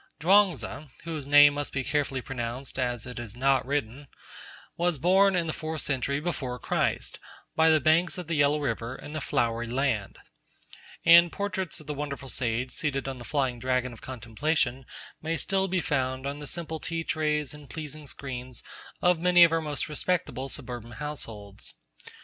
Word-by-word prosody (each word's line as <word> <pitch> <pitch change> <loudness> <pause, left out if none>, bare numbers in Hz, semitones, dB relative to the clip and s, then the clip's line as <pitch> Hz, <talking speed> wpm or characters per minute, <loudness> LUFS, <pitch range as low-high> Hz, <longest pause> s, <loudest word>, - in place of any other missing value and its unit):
Chuang 190 +4 +6
Tzu, 150 +3 -7 0.2
whose 160 -4 -5
name 145 0 +8
must 145 0 -4
carefully 140 -2 0
be - - -21
pronounced 125 +1 -4
as 120 -2 -1
it 125 -1 -7
is 120 -2 -7
not 135 +1 +3
written, 140 0 -2 0.7
was 175 -2 +1
born 190 +6 +4
in 175 -2 +1
the 160 - -2
fourth 160 -1 -4
century 140 0 0
before 140 -6 -3
Christ, - - -1 0.4
by 160 0 +5
the 160 -1 +5
banks 165 +4 +3
of 180 - -5
the 165 - -3
Yellow 145 0 +3
River, 115 -3 -2
in 150 - -9
the 155 - -3
Flowery 120 -2 0
Land; 120 -5 -1 0.9
and 170 0 +8
portraits 190 -3 -3
of 155 - -11
the 150 - -3
wonderful 140 -2 -5
sage 125 0 -1
seated 135 -2 -2
on 135 -2 -4
the - - -8
flying 130 -2 -1
dragon 125 0 0
of 115 - -13
contemplation 130 +2 -1 0.3
may 165 +1 -1
still 195 +2 +1
be 185 0 0
found 130 -3 -1
on 140 +1 -3
the 150 - -7
simple 160 -1 -4
tea 165 +1 -2
trays 150 -3 0
and 150 -2 -13
pleasing 155 -1 -7
screens 130 -3 -7 0.4
of 180 -2 +4
many 180 0 +7
of 170 - +6
our 165 0 +2
most 150 -2 -3
respectable 150 -3 -1
suburban 120 -2 -6
households. 115 -8 -6
145 Hz, 175 wpm, -28 LUFS, 125-160 Hz, 0.9 s, name